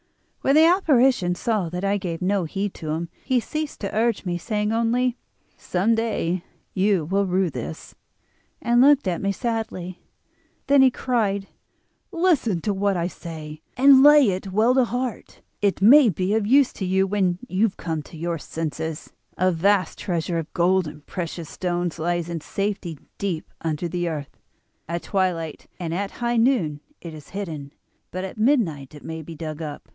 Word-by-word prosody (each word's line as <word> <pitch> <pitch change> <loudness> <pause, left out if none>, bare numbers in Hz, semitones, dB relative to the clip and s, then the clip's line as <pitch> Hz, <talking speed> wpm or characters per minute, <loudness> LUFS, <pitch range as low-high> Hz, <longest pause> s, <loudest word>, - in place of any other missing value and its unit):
"When 275 - +3
the 315 +1 +7
apparition 265 - +3
saw 205 -3 -1
that 180 +3 -5
I 200 +1 +2
gave 180 -3 -4
no 190 -1 +1
heed 195 +4 -3
to 155 - -7
him 165 +2 -2
he 260 -2 +2
ceased 305 +5 -4
to 200 0 -4
urge 225 -1 +1
me, 175 -1 -2
saying 210 +2 -1
only: 235 +2 +1 0.4
'Some 190 +6 0
day 210 -6 -1 0.3
you 190 -4 +2
will 195 +4 +1
rue 185 -1 +1
this,' 80 - -7 0.7
and 240 +1 +3
looked 285 -4 +5
at 175 -2 -1
me 200 - +1
sadly. 200 -5 -4 0.6
Then 280 -1 +5
he 265 - +7
cried: 215 -6 -1 0.6
'Listen 320 - +2
to 205 - 0
what 200 -1 0
I 170 - 0
say, 160 -3 -7 0.2
and 270 +1 +7
lay 290 -5 +7
it 190 +1 -4
well 220 +6 +3
to 260 -1 +4
heart, 245 0 -4 0.2
it 200 -2 +1
may 260 +3 +8
be 185 +2 -1
of 215 -2 +1
use 275 +3 +4
to 190 - -4
you 190 +1 +2
when 190 -3 +1
you 210 +3 +2
come 160 -3 -3
to 160 - -13
your 170 0 -2
senses. 160 +1 -5 0.2
A 185 +1 +3
vast 185 +1 +1
treasure 170 -1 -1
of 160 - -6
gold 180 0 +3
and 150 -1 -10
precious 170 -3 -5
stones 175 -2 -2
lies 175 +1 -1
in 170 -2 -4
safety 195 -3 -3 0.2
deep 185 -6 -3
under 160 +1 -2
the 175 0 -2
earth. 150 -3 -6 0.5
At 170 0 -3
twilight 175 -5 -2
and 165 -2 -3
at 195 +3 -2
high 240 0 +1
noon 225 - +2 0.2
it 170 -2 -8
is 150 -2 -12
hidden, 160 -8 -6 0.4
but 185 +1 -5
at 190 +2 -7
midnight 180 - +1
it 145 - -12
may 160 +3 -6
be 165 +1 -9
dug 155 0 -6
up. 150 -2 -7
190 Hz, 175 wpm, -23 LUFS, 165-225 Hz, 0.7 s, may